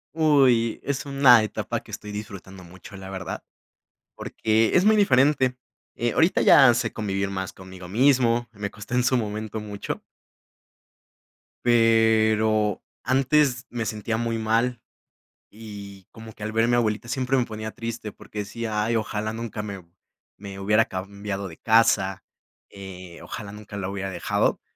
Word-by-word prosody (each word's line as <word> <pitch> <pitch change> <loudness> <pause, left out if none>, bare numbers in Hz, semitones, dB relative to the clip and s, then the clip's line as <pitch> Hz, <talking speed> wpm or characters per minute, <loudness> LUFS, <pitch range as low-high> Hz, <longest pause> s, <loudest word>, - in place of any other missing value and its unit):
Uy, 135 -8 +3
es 140 0 -3
una 135 -4 +6
etapa 110 - -3
que - - -21
estoy 105 0 -7
disfrutando 100 -3 -8
mucho, 90 +3 -13
la 95 0 -9
verdad, 95 -1 -6 0.7
porque 110 0 0
es 185 - +3
muy 220 - +6
diferente. 135 -8 +3 0.4
Eh, 120 -1 -1
ahorita 165 +3 +3
ya 135 -5 +8
sé 120 -2 -1
convivir 100 -2 -2
más 95 -1 -4
conmigo 95 -1 -12
mismo, 120 +1 +2
me 105 -2 -5
costó 105 +4 -10
en 125 0 +2
su 130 +1 +2
momento 110 -1 -4
mucho. 105 -1 -6 1.6
Pero, 110 -2 +3 0.2
antes 130 0 +2
me 115 -2 -3
sentía 110 +1 -3
muy 115 0 -1
mal, 115 +2 0 0.7
y 100 -3 -11
como 110 0 -11
que 105 - -11
al 110 0 -4
ver 115 +1 +2
mi 120 - +3
abuelita 115 0 -1
siempre 130 0 0
me 125 - +2
ponía 110 -1 -6
triste, 115 -2 -6
porque 105 - -9
decía: 105 +1 -3
"Ay, 115 - 0
ojalá 110 0 -2
nunca 115 -2 -5
me 100 -4 -7 0.5
me 100 -1 -9
hubiera 105 +3 +3
cambiado 100 0 -5
de 80 - -12
casa", 110 -4 +2 0.5
eh, 95 -3 -10
ojalá 100 -1 -7
nunca 105 0 -10
la 95 -2 -3
hubiera 95 0 -4
dejado, 90 -2 0
110 Hz, 150 wpm, -24 LUFS, 100-120 Hz, 1.6 s, ya